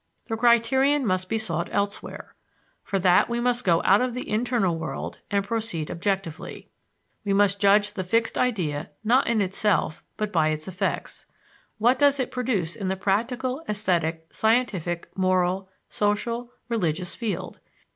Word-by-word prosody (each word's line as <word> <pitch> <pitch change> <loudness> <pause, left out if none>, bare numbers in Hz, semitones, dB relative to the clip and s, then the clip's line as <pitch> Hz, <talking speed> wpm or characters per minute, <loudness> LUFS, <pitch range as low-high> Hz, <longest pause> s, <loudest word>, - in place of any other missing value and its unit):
The 225 - -3
criterion 245 +5 +3
must 185 -2 0
be 225 - +1
sought 170 -6 -2
elsewhere. 200 0 -3 0.5
For 200 - -1
that 185 +1 +4
we 235 0 -1
must 245 0 +1
go 170 -2 +3
out 195 +4 +5
of 250 -1 -1
the 250 - -4
internal 220 -5 +1
world 160 - -5
and 200 -1 0
proceed 215 -8 -3
objectively. 180 -2 -3 0.5
We 200 -1 0
must 200 0 +3
judge 205 +1 +4
the 190 - -3
fixed 230 +5 +1
idea 175 -10 -1
not 250 +5 +3
in 230 -2 +2
itself 190 -3 0
but 210 -1 -2
by 160 -4 +3
its 155 +2 -3
effects. 190 +1 -3 0.5
What 245 +4 +3
does 285 -1 +4
it 255 - -1
produce 220 -10 -1
in 200 -4 -4
the 190 - 0
practical, 245 +8 -1
esthetic, 170 -6 -1
scientific, 210 -7 0
moral, 185 0 +1 0.2
social, 230 +4 -1 0.2
religious 180 -7 -1
field? 195 -6 -4
205 Hz, 150 wpm, -25 LUFS, 180-235 Hz, 0.5 s, out